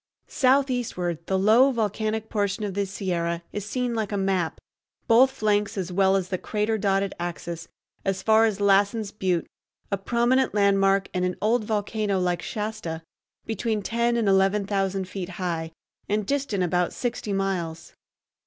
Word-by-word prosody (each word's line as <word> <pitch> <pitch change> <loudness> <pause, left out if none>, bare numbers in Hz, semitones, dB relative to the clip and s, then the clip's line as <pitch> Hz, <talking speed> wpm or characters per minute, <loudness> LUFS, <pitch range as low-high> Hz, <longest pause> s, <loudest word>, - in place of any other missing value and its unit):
Southeastward, 250 - +1
the 190 - +1
low 220 +8 +5
volcanic 220 -1 -1
portion 205 -1 -1
of 200 -2 -3
the 200 +1 -1
Sierra 170 -3 -2
is 205 0 -4
seen 250 0 -1
like 220 -3 -2
a 205 - -1
map, 190 -4 0 0.5
both 250 +3 +6
flanks 210 -4 0
as 185 -1 -3
well 190 +1 +3
as 185 -2 -1
the 185 -2 -2
crater 215 +1 -1
dotted 195 -1 0
axis, 170 -1 -5 0.4
as 190 -1 -1
far 220 0 +5
as 210 -3 -1
Lassen's 200 +1 +2
Butte, 185 -5 -1 0.5
a 200 - 0
prominent 240 +4 +1
landmark 195 -1 +3
and 180 -1 0
an 180 0 0
old 220 +1 +1
volcano 210 -2 -1
like 180 -1 0
Shasta, 210 -7 -4 0.4
between 220 -1 -2
ten 235 +3 +1
and 225 -3 +1
eleven 195 +1 +3
thousand 195 -1 -1
feet 190 -1 -5
high, 165 -3 -2 0.4
and 210 0 0
distant 265 -7 -1
about 180 0 0
sixty 240 -4 -3
miles. 180 -5 -2
200 Hz, 155 wpm, -25 LUFS, 185-220 Hz, 0.5 s, both